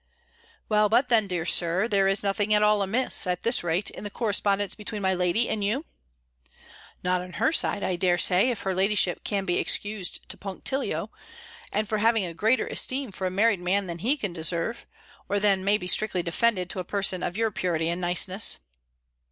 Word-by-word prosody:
"Well, 210 -1 +2
but 240 +5 +2
then, 220 -4 +3
dear 175 -3 -3
Sir, 175 +5 +3
there 200 -3 +2
is 195 +1 +1
nothing 205 +1 +1
at 210 - +3
all 210 -1 +3
amiss, 215 +2 +1
at 180 -1 -2
this 235 -4 +3
rate, 175 +4 -1
in - - -10
the 205 - -4
correspondence 205 -2 0
between 210 -1 -6
my 190 0 +2
lady 180 +6 +1
and 210 -2 -2
you?" 235 +10 -1 1.2
"Not 180 0 +1
on 180 0 -10
her - - +1
side, 205 -10 +2
I 185 -1 -1
dare 175 0 +2
say, 185 +7 +3
if 240 - -3
her 190 - -1
ladyship 190 -1 +1
can 200 -2 -2
be 175 - 0
excused 205 -3 0
to - - -3
punctilio, 205 +8 -3 0.6
and 215 0 -1
for 215 0 -1
having 225 -2 +2
a 170 - -6
greater 220 +9 +1
esteem 260 -3 0
for 190 0 -4
a - - -1
married 200 +1 +2
man, 190 +3 0
than 170 -1 -6
he 255 - 0
can 200 -9 -4
deserve, 170 +7 -2 0.4
or 205 - +1
than 195 -2 +2
may 200 +2 +3
be 180 - -8
strictly 180 -1 +1
defended 185 +1 0
to - - -4
a - - -3
person 190 -1 -1
of 180 +2 -4
your 225 -1 0
purity 175 -5 -1
and 170 +2 -2
niceness." 180 +3 +1
195 Hz, 200 wpm, -26 LUFS, 180-215 Hz, 1.2 s, then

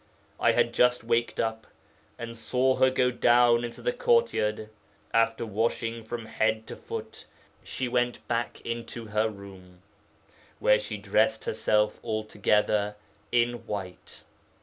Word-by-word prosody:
I - - +4
had - - +2
just 125 0 +3
waked 115 +1 0
up, 110 -1 -2 0.5
and 115 0 -7
saw 130 +3 +1
her 130 - +5
go 125 -1 +2
down 120 0 +4
into 120 - -7
the - - +1
courtyard. 470 - +1 0.4
After 115 0 +2
washing 115 +1 -1
from 115 +1 -6
head 110 0 0
to - - -6
foot 455 0 -8 0.4
she 130 - -3
went 120 0 -1
back 120 0 -2
into 115 0 -5
her 110 +1 0
room, 95 -3 -13 0.7
where 105 - +4
she 105 0 -5
dressed 110 +2 +1
herself 105 -1 +1
altogether 105 -1 0 0.4
in 120 -1 +1
white. 95 -3 -7
115 Hz, 130 wpm, -27 LUFS, 105-120 Hz, 0.7 s, her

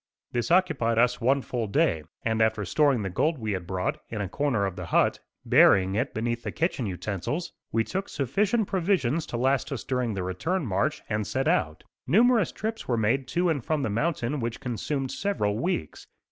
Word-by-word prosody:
This 120 -2 -1
occupied 160 -11 +2
us 125 +1 +3
one 135 +3 +2
full 120 -3 -3
day, 85 -5 +2 0.2
and 110 -1 +1
after 110 -2 +2
storing 140 - +2
the 95 - -2
gold 155 - +1
we 110 -3 -3
had 90 -3 -3
brought, 95 0 -2
in 110 - -4
a 100 - -2
corner 120 -1 0
of 95 -2 -3
the - - -6
hut, - - +2 0.3
burying 95 0 +5
it 125 +6 0
beneath 120 +1 -1
the - - -4
kitchen 160 - -1
utensils, 105 - -3 0.2
we 115 - +2
took 190 - -4
sufficient 200 - 0
provisions 170 - 0
to 120 - -4
last 135 +3 +1
us 135 - -4
during 125 -4 -1
the 95 - -2
return 150 - -2
march 105 +9 -1
and 105 -1 -2
set 135 0 -1
out. 80 0 0 0.2
Numerous 225 - +4
trips 220 +1 -4
were 120 - +1
made 115 +5 +1
to 175 +6 +1
and 145 -7 -1
from 155 +1 -1
the 110 - -1
mountain 145 +2 -1
which 115 0 -3
consumed 130 +2 -3
several 110 - -1
weeks. 125 - -3
125 Hz, 195 wpm, -27 LUFS, 105-155 Hz, 0.3 s, burying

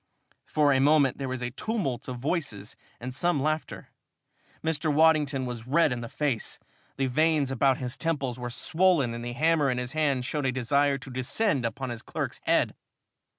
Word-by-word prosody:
For 145 -2 +3
a 135 - +3
moment 140 -1 +4
there 135 -1 -3
was 130 -1 -3
a 125 - -3
tumult 140 - -3
of 125 -1 -4
voices 120 - -2 0.2
and 125 +1 -6
some 175 +3 +1
laughter. 155 +3 -2 0.7
Mr. 155 -1 0
Waddington 150 -3 +3
was 120 -2 -6
red 155 +2 +3
in 120 -1 -2
the 115 - -6
face. 140 -7 -2 0.4
The 135 - +1
veins 150 +1 +2
about 135 +1 +3
his 125 0 -5
temples 140 -7 -2
were 120 0 -4
swollen 160 -1 +2
and 120 0 -6
the 120 0 -4
hammer 155 +1 +2
in 125 - 0
his 125 0 -3
hand 140 -5 0
showed 145 0 -1
a - - +2
desire 140 +3 +2
to 130 0 -11
descend 130 - 0
on 130 -2 -3
his 115 -2 -6
clerk's - - -4
head. - - +2
135 Hz, 185 wpm, -27 LUFS, 125-155 Hz, 0.7 s, moment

